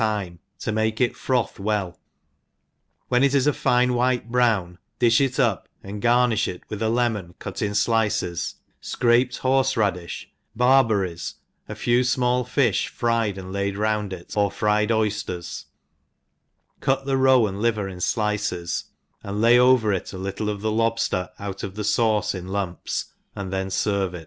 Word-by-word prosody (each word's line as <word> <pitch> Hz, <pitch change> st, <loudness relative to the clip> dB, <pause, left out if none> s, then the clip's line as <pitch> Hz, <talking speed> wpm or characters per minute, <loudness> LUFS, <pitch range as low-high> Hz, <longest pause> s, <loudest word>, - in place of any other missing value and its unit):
ai 105 Hz, -2 st, 0 dB
time 85 Hz, -2 st, -12 dB, 0.2 s
to 110 Hz, -, -3 dB
make 110 Hz, 0 st, 0 dB
it 125 Hz, -2 st, +1 dB
froth 125 Hz, -6 st, -1 dB
well; 100 Hz, -3 st, -2 dB, 1.1 s
when 125 Hz, +1 st, +3 dB
it 140 Hz, 0 st, +3 dB
is 135 Hz, -1 st, +3 dB
a 150 Hz, -, +3 dB
fine 125 Hz, 0 st, +2 dB
vrhite 125 Hz, -1 st, 0 dB
brown^ 105 Hz, -8 st, +1 dB, 0.2 s
di{h 120 Hz, +1 st, +4 dB
it 135 Hz, +1 st, -1 dB
up, 115 Hz, -8 st, +1 dB
and 100 Hz, +1 st, -7 dB
garni(h 120 Hz, -2 st, +3 dB
it 90 Hz, -, -6 dB
with 105 Hz, -1 st, -5 dB
a 110 Hz, -, +1 dB
lemon 110 Hz, -7 st, -1 dB
,cut -, -, -6 dB
in 105 Hz, -2 st, -1 dB
flices, 105 Hz, -6 st, 0 dB, 0.3 s
fcraped 120 Hz, +1 st, +1 dB
horfe 135 Hz, 0 st, +2 dB
radi(h» 95 Hz, -6 st, -1 dB, 0.3 s
bar 130 Hz, +3 st, +5 dB
berries, 95 Hz, -7 st, -2 dB, 0.3 s
a -, -, -5 dB
few 120 Hz, 0 st, +2 dB
fmall 125 Hz, 0 st, +1 dB
fi(hfryed 115 Hz, -3 st, 0 dB
and 95 Hz, 0 st, -7 dB
laid 100 Hz, 0 st, -2 dB
round 105 Hz, -1 st, 0 dB
it» 90 Hz, -2 st, -8 dB
or 100 Hz, -1 st, +2 dB
fryed 105 Hz, +1 st, +1 dB
oydcrs; 105 Hz, -6 st, -2 dB, 1.1 s
cut 135 Hz, 0 st, 0 dB
the 135 Hz, -1 st, +1 dB
roe 130 Hz, -3 st, +5 dB
and 100 Hz, 0 st, -4 dB
liver 110 Hz, -4 st, +1 dB
in 95 Hz, -2 st, -8 dB
dices, 105 Hz, -3 st, -1 dB, 0.4 s
and 100 Hz, +1 st, -4 dB
lay 120 Hz, +2 st, +6 dB
over 125 Hz, -4 st, +4 dB
it 95 Hz, -, -3 dB
a 95 Hz, -, -7 dB
little 100 Hz, +3 st, -3 dB
of 105 Hz, -1 st, -4 dB
the 110 Hz, 0 st, 0 dB
lobfter 115 Hz, -5 st, 0 dB
out 100 Hz, -1 st, -6 dB
of 95 Hz, 0 st, -6 dB
the 105 Hz, -, -4 dB
fauce 105 Hz, 0 st, +1 dB
in 90 Hz, -1 st, -6 dB
lumps, 95 Hz, -2 st, -3 dB, 0.2 s
and 95 Hz, -2 st, -5 dB
then 95 Hz, 0 st, -1 dB
ferve 95 Hz, -1 st, -1 dB
it. -, -, -6 dB
110 Hz, 170 wpm, -23 LUFS, 100-120 Hz, 1.1 s, lay